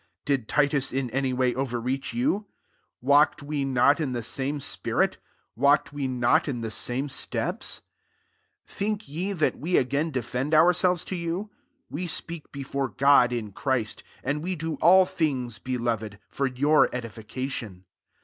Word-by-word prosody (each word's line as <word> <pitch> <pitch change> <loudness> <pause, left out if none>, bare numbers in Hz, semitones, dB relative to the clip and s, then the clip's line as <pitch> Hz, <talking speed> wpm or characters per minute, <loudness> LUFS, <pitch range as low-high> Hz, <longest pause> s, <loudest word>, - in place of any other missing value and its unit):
Did 135 -6 0
Titus 145 -2 +2
in 130 -2 -2
any 135 +1 0
way 125 -1 +1
overreach 130 +1 -2
you? 235 -4 0 0.5
walked 145 +3 +4
we 145 -1 -2
not 135 +2 +3
in 140 -5 -1
the 120 -1 -3
same 135 +5 -2
spirit? - - 0 0.4
walked 140 +4 +3
we 140 -2 -2
not 130 +6 +2
in 125 -5 -3
the 110 -1 -4
same 125 +6 -1
steps? 135 - -1 0.8
19 - - -18
Think 210 -1 -2
ye 175 +8 -3
that 155 -5 0
we 170 +5 -3
a^n 140 +3 +2
defend 130 +3 -1
ourselves 180 +2 +4
to 190 - -4
you? 175 +5 -3 0.4
w^ 175 +4 -3
speak 165 -1 -3
before 140 -1 -3
God 135 -3 +5
in 115 -4 -3
Christ: 120 0 -1 0.2
and 145 +3 -1
we 185 +3 -2
do 160 0 -3
all 185 +2 +7
things, 130 -10 -2
belove4» 115 -5 -2
for 140 -1 0
yovir 145 +5 +4
edification. 115 -3 -5
140 Hz, 150 wpm, -26 LUFS, 125-155 Hz, 0.8 s, all